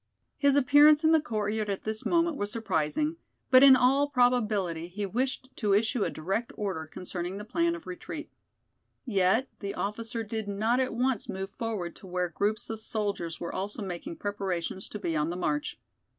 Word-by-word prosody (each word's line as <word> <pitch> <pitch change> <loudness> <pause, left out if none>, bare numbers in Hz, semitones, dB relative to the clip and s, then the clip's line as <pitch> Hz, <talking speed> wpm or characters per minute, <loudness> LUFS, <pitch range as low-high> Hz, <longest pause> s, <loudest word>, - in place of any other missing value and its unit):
His 280 -1 +4
appearance 290 +3 +6
in 315 - +5
the 320 -1 +5
courtyard 215 -4 -2
at 195 - -3
this 220 0 -2
moment 335 -2 +2
was 205 -5 -3
surprising, 225 - -1 0.3
but 255 0 +8
in 270 -1 +10
all 275 +3 +3
probability 215 - +1
he 200 +3 -4
wished 260 +5 -2
to 205 -3 +2
issue 220 +1 +1
a - - 0
direct 195 +9 -3
order 190 -7 -3
concerning 180 +2 -5
the 205 - -7
plan 335 +8 +1
of 335 - -10
retreat. 350 0 -7 0.7
Yet 205 +2 +2
the 200 -1 -4
officer 225 +2 -3
did 220 0 -4
not 220 +5 +1
at 255 -3 0
once 250 -2 0
move 190 +1 -4
forward 210 -7 -4
to 190 - -12
where 180 -1 -1
groups 205 +6 -1
of 220 -1 -4
soldiers 205 -7 -3
were 170 - -5
also 205 +4 -3
making 195 - -5
preparations 195 - -3
to - - -5
be 170 -5 -2
on 150 +1 +1
the 175 - -3
march. 150 -4 -2
215 Hz, 180 wpm, -29 LUFS, 190-255 Hz, 0.7 s, in